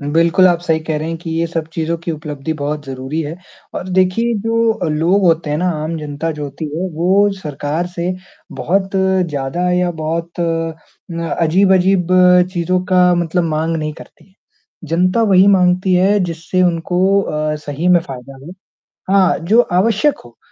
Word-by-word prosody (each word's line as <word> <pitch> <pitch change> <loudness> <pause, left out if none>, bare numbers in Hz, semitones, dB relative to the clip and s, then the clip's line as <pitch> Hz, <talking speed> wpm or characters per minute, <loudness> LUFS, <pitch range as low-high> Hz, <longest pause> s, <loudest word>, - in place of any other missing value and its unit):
बिल्कुल, 165 +5 +3
आप 175 -1 +2
सही 165 -2 0
कह 155 -1 -3
रहे 155 - -4
हैं 165 - -3
कि 165 0 -7
ये 165 +1 0
सब 165 -1 -4
चीज़ों 165 0 -2
की 175 - -2
उपलब्धि 150 -1 -5
बहुत 150 +1 -3
ज़रूरी 135 +4 -4
है 155 +3 -6 0.4
और 185 - -5
देखिए 205 +6 +2
जो 225 -5 0
लोग 170 +6 +1
होते 165 -2 +1
हैं 150 - 0
ना, 180 +2 0
आम 155 0 -3
जनता 150 +1 -4
जो 150 - -4
होती 140 +3 -7
है 185 +3 -2
वो 190 +5 +3
सरकार 150 +1 -3
से 175 0 -3 0.5
बहुत 190 +2 0
ज़्यादा 180 -3 0
या 180 0 +1
बहुत 165 +2 -3
अ, 165 0 -4
अजीब-अजीब 185 +2 +3 0.5
चीज़ों 180 0 0
का 180 -1 +5
मतलब 175 0 0
माँग 160 +2 -1
नहीं 155 -1 -3
करती - - -16
है। 190 - -30 0.5
जनता 185 +7 +2
वही 195 -3 +5
माँगती 185 -1 +3
है, 195 +3 +3
जिससे 170 +2 -2
उनको 180 +3 +1
अ, 155 -3 -2
सही 150 +3 -3
में 180 -1 +5
फ़ायदा 135 -3 -10
हो 170 - -9 0.6
हाँ, 195 -1 +3
जो 210 +9 +4
आवश्यक 220 +8 +1
हो। 120 -1 -17
170 Hz, 170 wpm, -17 LUFS, 155-185 Hz, 0.6 s, का